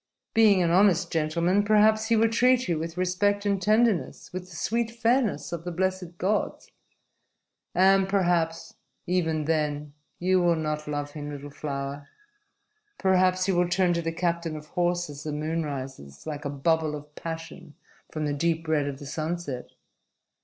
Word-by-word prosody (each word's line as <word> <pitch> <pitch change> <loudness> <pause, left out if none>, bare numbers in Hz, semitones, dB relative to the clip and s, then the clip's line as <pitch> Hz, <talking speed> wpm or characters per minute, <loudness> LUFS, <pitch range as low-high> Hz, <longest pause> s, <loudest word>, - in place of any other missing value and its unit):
Being 210 -5 +5
an 170 - +1
honest 185 -1 +4
gentleman, 170 +5 +1
perhaps 215 +1 +4
he 230 - +3
will 225 +1 +4
treat 250 +2 +3
you 170 -3 0
with 165 +1 -5
respect 200 +3 +1
and 200 -2 +1
tenderness, 215 -4 +1
with 185 0 -6
the 170 - -12
sweet 230 +7 -1
fairness 235 0 0
of 170 -1 -4
the 175 - -4
blessed 185 -1 -2
gods. 200 +4 -1 1.0
And 190 +1 +4
perhaps 175 -4 0 0.3
even 165 -4 0
then 150 -2 -1 0.2
you 185 +1 +2
will 175 -1 +3
not 155 -1 -3
love 145 -1 -3
him, 145 -1 -6
little 145 0 -7
flower. 140 0 -5 0.9
"Perhaps 185 -1 +2
you 190 - +2
will 175 0 +2
turn 180 0 +2
to 170 - 0
the 165 0 -2
captain 170 -1 -1
of 150 0 -9
horse 175 -1 0
as 145 -1 -9
the 150 - -4
moon 155 +3 -2
rises 130 - -7
like 150 -1 -5
a - - -1
bubble 155 +2 0
of 150 0 -10
passion 165 -2 -8 0.4
from 155 -1 -3
the 145 - -1
deep 165 +2 -1
red 150 -3 +1
of 140 -1 -4
the 145 - -10
sunset. 155 -2 -4
170 Hz, 165 wpm, -26 LUFS, 150-190 Hz, 1.0 s, Being